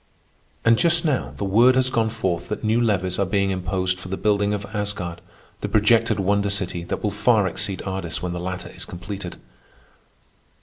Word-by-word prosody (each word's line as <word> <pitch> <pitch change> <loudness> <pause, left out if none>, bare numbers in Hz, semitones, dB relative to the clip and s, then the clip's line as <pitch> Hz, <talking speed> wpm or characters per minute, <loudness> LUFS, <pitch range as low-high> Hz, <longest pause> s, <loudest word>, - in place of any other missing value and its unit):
And 115 0 +5
just 170 0 +3
now 145 -5 0
the - - -3
word 115 +6 +5
has 130 0 +2
gone 115 -2 +1
forth 95 -6 -2
that 105 - -4
new 110 +2 +2
levies 95 -5 0
are 100 - +3
being 100 0 +1
imposed 90 0 -1
for 95 - -9
the 95 +1 -3
building 105 -1 +2
of 100 -1 -2
Asgard, 100 -5 -3 0.4
the - - -3
projected 110 0 +3
wonder 100 +1 +1
city 95 -4 -2
that - - -4
will 105 - +1
far 105 +1 +3
exceed 95 +1 -2
Ardis 95 -4 -3
when 90 -1 -3
the 90 - -4
latter 90 +1 -5
is - - -6
completed. 95 +3 -7
100 Hz, 185 wpm, -23 LUFS, 95-110 Hz, 0.4 s, And